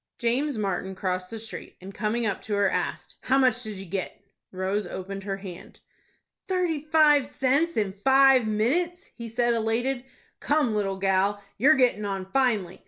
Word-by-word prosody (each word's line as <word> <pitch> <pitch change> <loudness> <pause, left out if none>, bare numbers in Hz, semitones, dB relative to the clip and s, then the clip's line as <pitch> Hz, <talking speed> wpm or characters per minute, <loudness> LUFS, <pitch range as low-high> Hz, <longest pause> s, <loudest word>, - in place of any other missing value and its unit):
James 255 +3 0
Martin 190 -2 -2
crossed 185 -1 -3
the 225 - -6
street, 220 0 -8
and, 190 +2 -10
coming 230 +3 -1
up 200 -3 -2
to 210 - -3
her, 200 -1 +3
asked, - - -3
"How 265 - +2
much 255 -2 +3
did 215 -4 -5
you 195 - -7
get?" 185 +1 -4 0.3
Rose 190 +2 -2
opened 195 +1 -6
her 195 -1 -3
hand. 190 -3 -10 0.7
"Thirty 360 -5 0
five 305 -3 +4
cents 280 +5 0
in 205 -3 0
five 265 +2 +5
minutes," 335 - 0
he 235 -2 -7
said, 240 +1 +1
elated. 235 +3 -1 0.4
"Come, 290 -6 +1
little 195 -2 -1
gal, 195 +1 +1 0.2
you're 290 +7 +6
gettin' 250 -5 +2
on 195 -2 -3
finely. 210 -5 0
220 Hz, 170 wpm, -26 LUFS, 195-265 Hz, 0.7 s, you're